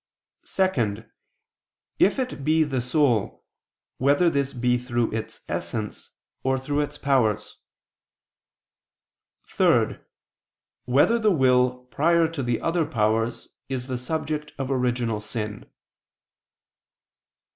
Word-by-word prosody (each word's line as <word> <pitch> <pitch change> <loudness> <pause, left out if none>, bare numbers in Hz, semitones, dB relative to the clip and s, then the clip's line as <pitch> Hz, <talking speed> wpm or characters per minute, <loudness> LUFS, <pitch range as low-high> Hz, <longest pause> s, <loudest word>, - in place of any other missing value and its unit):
(2) 120 - 0 1.0
If 200 - +4
it 255 - -3
be 155 +2 +3
the 135 -4 -1
soul, 125 -4 +1 0.5
whether 145 +6 +3
this 140 -2 0
be 125 -1 +1
through 120 -2 -1
its 110 0 -5
essence, 110 -2 -4 0.3
or 130 0 +1
through 145 +2 -2
its 145 - -2
powers? 110 -7 0 1.9
(3) - - +2 0.9
Whether 145 - +3
the 215 -1 +3
will 125 -6 +3
prior 170 +2 +3
to 160 -3 -5
the 120 -2 0
other 165 -1 0
powers 110 +1 0 0.2
is 130 -2 -2
the 130 -1 -3
subject 150 +2 -3
of 135 -1 -3
original 120 -4 0
sin? 105 -1 -5
130 Hz, 105 wpm, -25 LUFS, 120-150 Hz, 1.9 s, If